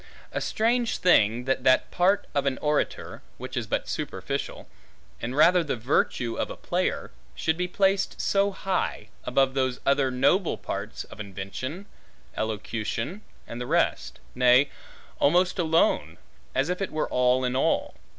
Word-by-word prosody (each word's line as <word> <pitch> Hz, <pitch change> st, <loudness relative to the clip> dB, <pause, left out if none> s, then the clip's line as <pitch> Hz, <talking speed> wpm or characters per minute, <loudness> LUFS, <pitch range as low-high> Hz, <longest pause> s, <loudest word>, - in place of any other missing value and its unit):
A -, -, -3 dB
strange 235 Hz, +2 st, +1 dB
thing, 115 Hz, -, +4 dB
that 130 Hz, -1 st, 0 dB
that 130 Hz, -1 st, +3 dB
part 190 Hz, +3 st, +2 dB
of 140 Hz, -1 st, 0 dB
an 135 Hz, -, 0 dB
orator, 150 Hz, 0 st, -2 dB, 0.2 s
which -, -, -7 dB
is -, -, -2 dB
but -, -, -2 dB
superficial, -, -, -4 dB, 0.5 s
and 120 Hz, +2 st, -3 dB
rather 175 Hz, +4 st, +5 dB
the 145 Hz, -, -2 dB
virtue 120 Hz, -1 st, 0 dB
of -, -, -1 dB
a -, -, -6 dB
player, -, -, -2 dB, 0.2 s
should 160 Hz, -, 0 dB
be 180 Hz, +1 st, -1 dB
placed 195 Hz, +1 st, +1 dB
so 200 Hz, 0 st, +2 dB
high, 195 Hz, -1 st, -2 dB, 0.2 s
above 135 Hz, -1 st, +2 dB
those 130 Hz, -2 st, 0 dB
other 140 Hz, -1 st, +3 dB
noble 165 Hz, +9 st, +2 dB
parts, -, -, -5 dB
of -, -, -14 dB
invention, 100 Hz, -, -6 dB, 0.5 s
elocution, 110 Hz, -, -3 dB, 0.3 s
and 120 Hz, -, -6 dB
the 125 Hz, -, -4 dB
rest; -, -, 0 dB
nay, 125 Hz, +2 st, +4 dB, 0.5 s
almost 180 Hz, +6 st, +3 dB
alone, 165 Hz, -1 st, +2 dB, 0.4 s
as 135 Hz, +5 st, +1 dB
if 180 Hz, +2 st, -2 dB
it 195 Hz, -, -1 dB
were 155 Hz, -, -2 dB
all 125 Hz, 0 st, +2 dB
in 125 Hz, 0 st, -1 dB
all. 130 Hz, -, +1 dB
140 Hz, 150 wpm, -26 LUFS, 125-180 Hz, 0.5 s, rather